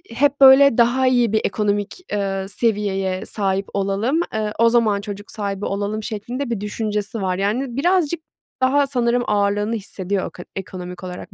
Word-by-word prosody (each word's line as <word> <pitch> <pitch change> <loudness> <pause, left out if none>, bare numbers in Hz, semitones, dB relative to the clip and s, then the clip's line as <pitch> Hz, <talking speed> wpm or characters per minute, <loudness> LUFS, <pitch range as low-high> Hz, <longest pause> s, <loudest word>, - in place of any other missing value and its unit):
hep, 285 +2 +2
böyle, 270 -1 +8
"Daha 245 +2 +3
iyi 245 -3 +3
bir 220 - +3
ekonomik, 205 - -1
eee, 195 -2 -1
seviyeye 200 -3 -1
sahip 195 -2 -1
olalım. 200 +9 0
Eee, 215 -1 -2
o 230 0 +6
zaman 220 -4 +2
çocuk 205 0 -8
sahibi 200 -2 -4
olalım." 205 +2 -2
şeklinde 235 +6 -4
bir 230 -4 -2
düşüncesi 210 +1 -3
var. 185 -1 -1
Yani, 235 +6 -1
birazcık 340 +1 +2 0.4
daha 275 +2 +3
sanırım 245 -2 +1
ağırlığını 205 +2 +1
hissediyor 195 -2 -3
eko 180 - -10
ekonomik 180 -1 -7
olarak 180 -1 -8
210 Hz, 155 wpm, -21 LUFS, 200-245 Hz, 0.4 s, böyle